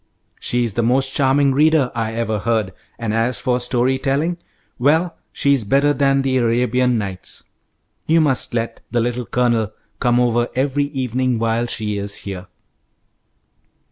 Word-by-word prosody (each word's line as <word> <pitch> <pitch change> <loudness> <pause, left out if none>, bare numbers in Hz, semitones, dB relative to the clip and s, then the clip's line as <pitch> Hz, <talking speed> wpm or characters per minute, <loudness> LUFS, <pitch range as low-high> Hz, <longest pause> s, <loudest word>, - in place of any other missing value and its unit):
She 120 0 0
is 115 -4 -2
the 120 - 0
most 135 +3 +1
charming 140 0 +3
reader 150 -2 +3
I 115 -1 -2
ever 110 -2 -1
heard, 110 -3 -1 0.2
and 115 -2 -3
as 115 +2 +1
for 125 -2 0
story 125 +1 0
telling 155 +6 0 0.4
well, 160 +6 +2 0.2
she's 140 -4 +1
better 140 +7 +3
than 135 -1 +2
the 130 -1 +1
'Arabian 125 +1 +2
Nights.' 95 -4 -5 0.6
You 165 +1 +4
must 145 -5 +1
let 115 0 -3
the 120 - 0
Little 120 +1 -2
Colonel 120 -4 +1 0.3
come 120 0 +2
over 120 -1 +2
every 140 +2 +1
evening 130 -3 -1
while 115 +1 0
she 105 -3 -2
is 100 0 -3
here." 95 -2 -6
125 Hz, 150 wpm, -20 LUFS, 115-135 Hz, 0.6 s, You